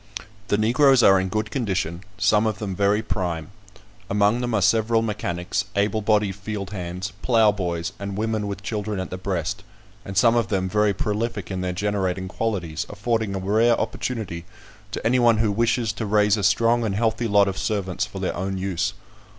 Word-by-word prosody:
The 105 - +2
Negroes 125 +4 +4
are 95 -1 +7
in 95 0 -2
good 110 +2 -2
condition, 95 - -2
some 110 +2 +3
of 110 - -1
them 100 -3 -4
very 100 +3 +2
prime; 85 -2 -3 0.6
among 105 +4 +2
them 120 -2 -1
are 105 - +2
several 115 +2 +3
mechanics, 90 -4 -2
able 105 +2 +1
bodied 105 -2 +2
field 100 0 -6
hands, 90 0 -5
ploughboys, 95 -7 +1
and 100 -1 -5
women 110 -1 -1
with 100 0 -5
children 105 -2 -3
at 95 - -5
the 95 - -5
breast, 90 -4 -3 0.4
and 95 -1 -6
some 115 +4 +5
of 115 -4 +2
them 95 -2 0
very 105 +2 +2
prolific 105 0 -2
in 95 -1 -3
their 90 0 -1
generating 95 -1 -1
qualities, 90 -7 -3
affording 110 -1 -1
a - - -1
rare 110 +5 +2
opportunity 110 -8 -3 0.5
to - - -6
any 125 +3 +3
one 120 -2 +5
who 110 -1 +2
wishes 115 +1 +1
to 110 -1 -4
raise 105 0 +3
a 105 - -2
strong 115 +4 +3
and 105 -4 -1
healthy 115 +2 0
lot 100 -1 +4
of 95 - -2
servants 100 -2 -2
for - - -6
their - - -2
own 95 +1 -3
use. 95 0 -2
105 Hz, 185 wpm, -23 LUFS, 95-110 Hz, 0.6 s, are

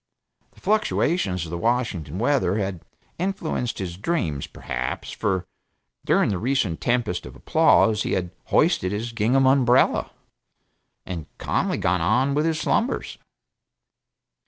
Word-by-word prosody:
The - - -20
fluctuations 165 - +1
of 80 - -8
the 85 - -3
Washington 110 - -1
weather 120 -5 +1
had 95 -4 -3 0.4
influenced 175 - -2
his 90 -3 -5
dreams, 95 - -2
perhaps, 60 0 -4
for 95 -3 -1 0.6
during - - +3
the 95 - -1
recent 115 -8 0
tempest 120 -7 0
of - - -12
applause 110 -1 +3
he - - -1
had 90 -2 -1
hoisted 90 - +2
his 110 +3 -3
gingham 120 +4 +2
umbrella, 130 -1 +4 1.0
and 85 -4 -6
calmly - - -1
gone 90 0 +1
on 125 +10 +2
with 150 +3 +1
his 160 -1 0
slumbers. 240 +9 -1
110 Hz, 130 wpm, -24 LUFS, 90-135 Hz, 1.0 s, umbrella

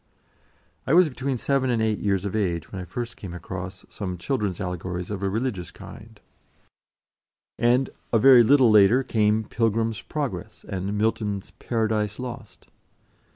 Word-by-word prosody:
I 140 - +4
was 180 -2 +6
between 135 0 -3
seven 135 +1 0
and 120 -2 +1
eight 110 -1 0
years 100 -2 0
of 100 - -3
age 85 -6 -1
when 95 - -5
I - - -7
first 115 +7 -5
came 90 -3 -8
across 95 +1 -7
some 90 -4 -5
children's 100 -2 -2
allegories 90 0 -4
of 100 -2 -4
a 100 - 0
religious 105 -4 -2
kind, - - -13 1.4
and 125 +3 +2 0.2
a 115 - +4
very 125 +1 +8
little 130 0 +5
later 110 +5 +6
came 110 -2 +1
"Pilgrim's 115 -1 -1
Progress," 135 -7 -5
and 100 +1 -3
Milton's 105 -2 -1
"Paradise 110 -3 -1
Lost." 120 -3 -8
110 Hz, 150 wpm, -25 LUFS, 95-120 Hz, 1.4 s, very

